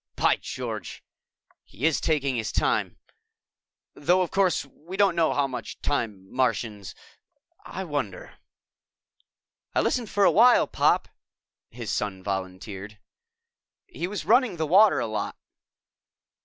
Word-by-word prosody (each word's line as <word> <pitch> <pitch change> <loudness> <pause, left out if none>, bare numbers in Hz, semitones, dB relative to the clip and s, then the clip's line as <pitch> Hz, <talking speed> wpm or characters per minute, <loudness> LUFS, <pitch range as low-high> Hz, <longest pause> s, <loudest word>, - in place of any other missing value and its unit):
"By - - +3
George, - - -6 0.6
he 125 - -5
is 160 -2 +2
taking 140 -5 +1
his 110 -3 -2
time! - - 0 1.0
Though, 180 +5 +2
of 175 - -5
course, 190 -6 +2
we 165 +7 -10
don't 200 -4 +3
know 165 -2 +3
how 145 - +1
much 130 -2 -6
time 105 -9 -2
Martians... 110 -6 -1 0.7
I 190 - -5
wonder." 145 - -5 1.4
"I - - +4
listened 235 -4 -1
for 205 - +1
a - - +6
while, 240 +4 +6
Pop," - - +2 0.6
his - - -6
son 95 -3 -3
volunteered. 95 +2 -5 0.9
"He 175 - -5
was 205 +2 -5
running 235 -4 +3
the 160 - 0
water 195 +7 +6
a 120 - -1
lot." 110 -2 -4
145 Hz, 130 wpm, -26 LUFS, -, 1.4 s, a